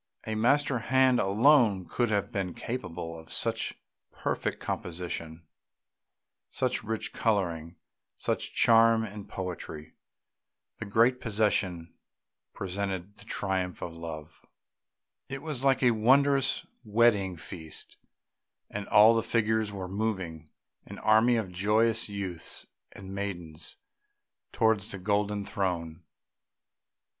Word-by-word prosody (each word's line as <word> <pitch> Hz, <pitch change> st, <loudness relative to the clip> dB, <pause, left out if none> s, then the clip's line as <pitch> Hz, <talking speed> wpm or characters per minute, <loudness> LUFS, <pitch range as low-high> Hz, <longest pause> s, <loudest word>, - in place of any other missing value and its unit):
A 110 Hz, -, -3 dB
master 130 Hz, +4 st, +2 dB
hand 130 Hz, +1 st, +3 dB
alone 105 Hz, -1 st, +4 dB
could 120 Hz, -2 st, 0 dB
have 100 Hz, -2 st, 0 dB
been 95 Hz, -3 st, -3 dB
capable 85 Hz, -9 st, -5 dB
of 80 Hz, -, -13 dB
such -, -, 0 dB, 0.4 s
perfect -, -, -2 dB
composition, 85 Hz, -2 st, -5 dB, 1.0 s
such -, -, -1 dB
rich 110 Hz, 0 st, -3 dB
colouring, 85 Hz, -6 st, -1 dB, 0.4 s
such -, -, -2 dB
charm 115 Hz, 0 st, +5 dB
and 105 Hz, -1 st, -8 dB
poetry. 85 Hz, -4 st, -6 dB, 0.9 s
The -, -, -4 dB
great 115 Hz, +5 st, +3 dB
procession 100 Hz, -6 st, 0 dB, 0.6 s
represented 95 Hz, 0 st, -4 dB
the -, -, -12 dB
triumph 95 Hz, -2 st, -2 dB
of 85 Hz, -, -5 dB
Love. 80 Hz, -2 st, -8 dB, 0.9 s
It 135 Hz, +1 st, -5 dB
was 150 Hz, -5 st, -3 dB
like 135 Hz, -1 st, +3 dB
a 125 Hz, -, +6 dB
wondrous 135 Hz, +4 st, +3 dB, 0.2 s
wedding 105 Hz, -5 st, +3 dB
feast, 80 Hz, 0 st, -6 dB, 0.7 s
and 100 Hz, 0 st, -5 dB
all 110 Hz, +2 st, +7 dB
the 115 Hz, -, +2 dB
figures 110 Hz, -2 st, +1 dB
were 95 Hz, -2 st, -5 dB
moving, 95 Hz, -6 st, -3 dB, 0.3 s
an -, -, -10 dB
army 110 Hz, +3 st, +4 dB
of 110 Hz, -5 st, -2 dB
joyous 110 Hz, +5 st, +2 dB
youths 95 Hz, -5 st, -4 dB, 0.3 s
and 95 Hz, 0 st, -9 dB
maidens, 90 Hz, -5 st, -5 dB, 0.8 s
towards 110 Hz, -3 st, +1 dB
a -, -, -5 dB
golden 100 Hz, +1 st, 0 dB
throne. 85 Hz, -4 st, -2 dB
100 Hz, 115 wpm, -29 LUFS, 90-115 Hz, 1.0 s, all